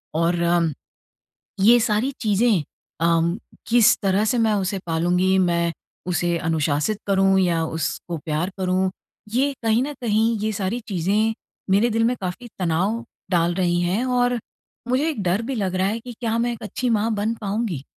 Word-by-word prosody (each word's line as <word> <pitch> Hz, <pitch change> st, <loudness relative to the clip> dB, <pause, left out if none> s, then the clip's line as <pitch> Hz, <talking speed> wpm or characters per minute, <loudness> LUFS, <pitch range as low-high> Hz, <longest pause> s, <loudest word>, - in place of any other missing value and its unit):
और 170 Hz, +1 st, +1 dB
अम 170 Hz, -2 st, +2 dB, 0.9 s
ये 235 Hz, +5 st, +6 dB
सारी 220 Hz, +4 st, +1 dB
चीज़ें। 215 Hz, -3 st, +2 dB, 0.4 s
अ, 170 Hz, +2 st, +2 dB, 0.3 s
किस 235 Hz, -2 st, +5 dB
तरह 195 Hz, +1 st, +2 dB
से 245 Hz, +3 st, +1 dB
मैं 220 Hz, -2 st, +3 dB
उसे 195 Hz, -1 st, -1 dB
पालूँगी? 180 Hz, +3 st, +2 dB
मैं 170 Hz, -2 st, +2 dB, 0.4 s
उसे 175 Hz, -1 st, 0 dB
अनुशासित 160 Hz, +4 st, 0 dB
करूँ 195 Hz, -1 st, +3 dB
या 170 Hz, -3 st, +2 dB
उसको 160 Hz, +2 st, -3 dB
प्यार 155 Hz, +3 st, -2 dB
करूँ। 185 Hz, 0 st, 0 dB, 0.4 s
ये 275 Hz, +3 st, +2 dB
कहीं 225 Hz, +2 st, +3 dB
न 290 Hz, +2 st, -4 dB
कहीं, 225 Hz, 0 st, +2 dB
ये 215 Hz, +1 st, -1 dB
सारी 200 Hz, +3 st, -2 dB
चीज़ें 205 Hz, +4 st, +1 dB, 0.4 s
मेरे 205 Hz, +5 st, +4 dB
दिल 225 Hz, 0 st, +1 dB
में 245 Hz, +2 st, +2 dB
काफ़ी 185 Hz, +6 st, -5 dB
तनाव 185 Hz, +7 st, 0 dB, 0.3 s
डाल 170 Hz, 0 st, +2 dB
रही 175 Hz, -2 st, +1 dB
है 185 Hz, +7 st, 0 dB
और 245 Hz, -1 st, +1 dB, 0.5 s
मुझे 260 Hz, +5 st, +1 dB
एक 280 Hz, -9 st, -3 dB
डर 185 Hz, +4 st, +1 dB
भी 265 Hz, +3 st, -3 dB
लग 190 Hz, -5 st, -1 dB
रहा 185 Hz, +1 st, +1 dB
है 220 Hz, +3 st, -2 dB
कि 245 Hz, +1 st, -9 dB
क्या 230 Hz, -2 st, -1 dB
मैं 240 Hz, +1 st, +1 dB
एक 230 Hz, -, -10 dB
अच्छी 245 Hz, +4 st, -2 dB
माँ 225 Hz, 0 st, +1 dB
बन 210 Hz, +3 st, 0 dB
पाऊँगी? 200 Hz, -, -2 dB
195 Hz, 170 wpm, -22 LUFS, 175-230 Hz, 0.9 s, ये